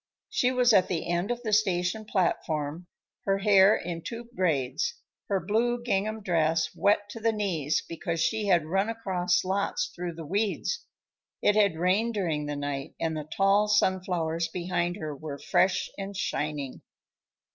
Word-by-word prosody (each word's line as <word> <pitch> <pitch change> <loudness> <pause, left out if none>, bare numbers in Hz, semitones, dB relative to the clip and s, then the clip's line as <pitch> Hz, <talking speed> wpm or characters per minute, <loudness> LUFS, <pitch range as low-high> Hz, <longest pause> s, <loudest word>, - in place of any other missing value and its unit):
She 250 - +2
was 250 -2 +4
at 190 -3 +5
the 170 -3 -2
end 175 +3 0
of 245 0 -3
the 215 -2 -1
station 200 0 +1
platform, 165 -4 -1 0.4
her 195 0 +2
hair 195 0 +6
in 170 -1 -4
two 230 +5 -6
braids, 175 - 0 0.3
her 195 -1 +1
blue 235 +6 0
gingham 215 -1 -1
dress 160 -3 +2
wet 205 0 +2
to 230 - -7
the 225 +1 +2
knees 175 -9 -1
because 165 0 -3
she 215 +5 0
had 175 -5 +3
run 195 +6 0
across 185 -6 0
lots 200 - -1
through 175 -1 -4
the 165 -1 -7
weeds. 205 - -1 0.6
It 205 - +4
had 200 -6 +3
rained 200 +7 +1
during 160 -7 -1
the 145 - -3
night, 145 0 -4
and 160 -1 -1
the 155 0 -6
tall 200 +2 +4
sunflowers 180 -5 +1
behind 175 -1 -2
her 155 -7 -5
were 145 0 -6
fresh 185 +5 +2
and 195 0 -5
shining. 150 -8 -3
185 Hz, 160 wpm, -28 LUFS, 165-210 Hz, 0.6 s, hair